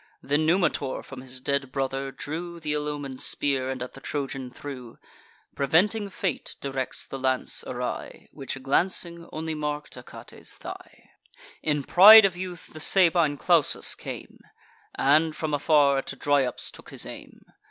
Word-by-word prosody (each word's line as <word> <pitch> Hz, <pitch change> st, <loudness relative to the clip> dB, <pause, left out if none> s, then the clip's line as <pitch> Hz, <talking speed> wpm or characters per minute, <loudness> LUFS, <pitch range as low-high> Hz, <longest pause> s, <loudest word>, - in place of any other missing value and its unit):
Then 145 Hz, +3 st, +1 dB
Numitor 175 Hz, -6 st, +1 dB
from 135 Hz, -2 st, -10 dB
his 130 Hz, 0 st, -7 dB
dead 140 Hz, 0 st, -1 dB
brother 135 Hz, 0 st, -2 dB
drew 170 Hz, +5 st, -6 dB
Th' -, -, -19 dB
ill 150 Hz, 0 st, -1 dB
omen'd 140 Hz, -3 st, -5 dB
spear, 135 Hz, -2 st, 0 dB
and 130 Hz, -1 st, -3 dB
at 125 Hz, -, -9 dB
the 135 Hz, -, -12 dB
Trojan 135 Hz, -3 st, -4 dB
threw: 125 Hz, -2 st, -9 dB, 0.6 s
Preventing 200 Hz, +9 st, +2 dB
fate 185 Hz, -5 st, -3 dB
directs 135 Hz, -2 st, -3 dB
the 135 Hz, -, -7 dB
lance 130 Hz, -1 st, 0 dB
awry, -, -, -5 dB
Which, 135 Hz, 0 st, -6 dB
glancing, 170 Hz, +3 st, 0 dB
only 160 Hz, 0 st, -4 dB
mark'd 150 Hz, -1 st, -4 dB
Achates' -, -, -9 dB
thigh. -, -, -11 dB, 0.5 s
In 150 Hz, -2 st, 0 dB
pride 210 Hz, +8 st, +9 dB
of 190 Hz, -3 st, +1 dB
youth 180 Hz, -2 st, -8 dB
the 155 Hz, -, -9 dB
Sabine 170 Hz, -4 st, +4 dB
Clausus 165 Hz, -1 st, +3 dB
came, -, -, -9 dB, 0.6 s
And, 155 Hz, +3 st, +3 dB
from 155 Hz, -1 st, -3 dB
afar, 145 Hz, -2 st, +3 dB
at -, -, -7 dB
Dryops 140 Hz, -3 st, 0 dB
took -, -, -14 dB
his -, -, -3 dB
aim. -, -, -11 dB
145 Hz, 150 wpm, -26 LUFS, 135-165 Hz, 0.6 s, pride